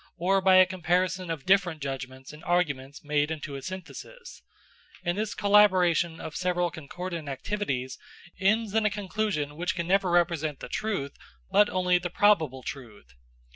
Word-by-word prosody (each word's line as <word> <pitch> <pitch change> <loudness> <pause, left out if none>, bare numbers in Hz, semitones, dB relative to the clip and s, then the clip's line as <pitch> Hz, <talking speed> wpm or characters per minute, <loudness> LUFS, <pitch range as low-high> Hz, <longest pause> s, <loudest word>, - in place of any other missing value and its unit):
or 190 +3 +2
by 190 0 +5
a 185 0 +8
comparison 185 0 -1
of 160 -4 -4
different 185 -4 +3
judgments 135 -1 -6
and 150 +2 -13
arguments 145 -6 -1
made 150 0 +1
into 155 -2 -5
a 135 - -6
synthesis; 185 - -9 0.6
and 175 0 0
this 215 +2 -3
collaboration 180 -5 +4
of 155 - -7
several 180 -1 0
concordant 165 0 -6
activities 135 - -3 0.4
ends 210 +2 +2
in 220 0 +2
a 215 - +3
conclusion 200 -7 -2
which 180 +3 -2
can 170 -1 -2
never 190 +1 +2
represent 165 -4 +1
the - - -7
truth, 195 -11 -3 0.4
but 210 - +5
only 180 -1 +2
the 175 0 -4
probable 160 -10 +2
truth. 110 - -9
175 Hz, 155 wpm, -27 LUFS, 150-190 Hz, 0.6 s, a